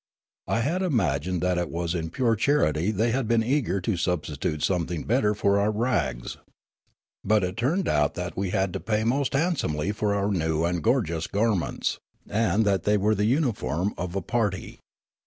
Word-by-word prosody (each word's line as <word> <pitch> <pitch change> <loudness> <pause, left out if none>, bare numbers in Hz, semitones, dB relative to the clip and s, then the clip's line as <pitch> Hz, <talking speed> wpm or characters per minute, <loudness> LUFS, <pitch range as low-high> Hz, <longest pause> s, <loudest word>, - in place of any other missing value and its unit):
I 115 - +1
had 165 +10 0
imagined 90 - 0
that 90 -1 +1
it 85 - -2
was 85 0 -2
in 80 -2 -3
pure 115 +5 +1
charity 105 - +2
they 110 +3 +1
had 130 -1 0
been 115 0 +3
eager 125 -5 0
to 90 +1 -1
substitute 75 -3 -2
something 85 -3 -1
better 105 -3 +1
for 100 -1 +2
our 100 +1 +2
rags. 95 - -1 0.9
But 105 -1 +3
it 90 0 -2
turned 155 - 0
out 75 -1 +2
that 90 -3 -4
we 95 -1 -2
had 95 -2 0
to - - -3
pay 105 +4 -1
most 130 +5 0
handsomely 135 - 0
for 105 -1 0
our 100 +1 0
new 80 -3 0
and 85 0 -1
gorgeous 105 - 0
garments, 105 -3 0 0.3
and 110 0 +1
192 - - +3
Riallaro - - +4
that 95 - -1
they 105 0 +3
were 105 +2 +2
the 105 +2 +1
uuiforni 100 - -1
of 90 +1 -5
a 95 - -2
party. 105 -3 -2
100 Hz, 190 wpm, -26 LUFS, 85-115 Hz, 0.9 s, Riallaro